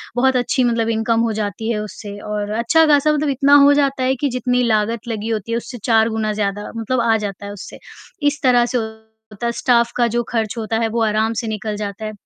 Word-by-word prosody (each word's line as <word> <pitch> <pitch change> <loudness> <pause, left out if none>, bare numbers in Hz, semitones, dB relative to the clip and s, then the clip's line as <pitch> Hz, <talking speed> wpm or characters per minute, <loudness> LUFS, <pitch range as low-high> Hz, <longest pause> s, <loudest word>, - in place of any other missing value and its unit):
बहुत 265 +1 +2
अच्छी 250 +1 +1
मतलब 230 -2 +1
इनकम 225 0 +1
हो 230 -1 0
जाती 215 +1 -3
है 210 - -1
उससे 205 -1 -8
और 210 0 -3
अच्छा 320 +8 +4
खासा 295 +1 +4
मतलब 300 -1 0
इतना 280 +2 +4
हो 285 - +6
जाता 275 -2 +1
है 260 +1 +2
कि 285 - +1
जितनी 250 0 0
लागत 225 +1 0
लगी 225 -1 -4
होती 220 0 -3
है 230 - +1
उससे 245 +1 -7
4 225 -1 +3
गुना 220 -1 -1
ज़्यादा 205 0 -3
मतलब 235 +2 -1
आ 225 - +4
जाता 205 -1 -6
है 200 - -6
उससे, 200 - -10 0.4
इस 290 +1 0
तरह 245 -2 +4
से 250 - -1 0.5
होता 210 +3 -6
है। 235 - +1
स्टाफ 235 -2 +2
का 240 - +2
जो 240 - +1
खर्च 225 -3 -1
होता 225 0 -2
है 225 - +1
वो 230 +1 -1
आराम 220 +1 +1
से 230 - -6
निकल 215 0 -3
जाता 205 +1 -5
है, 215 - -4
230 Hz, 235 wpm, -19 LUFS, 215-250 Hz, 0.5 s, हो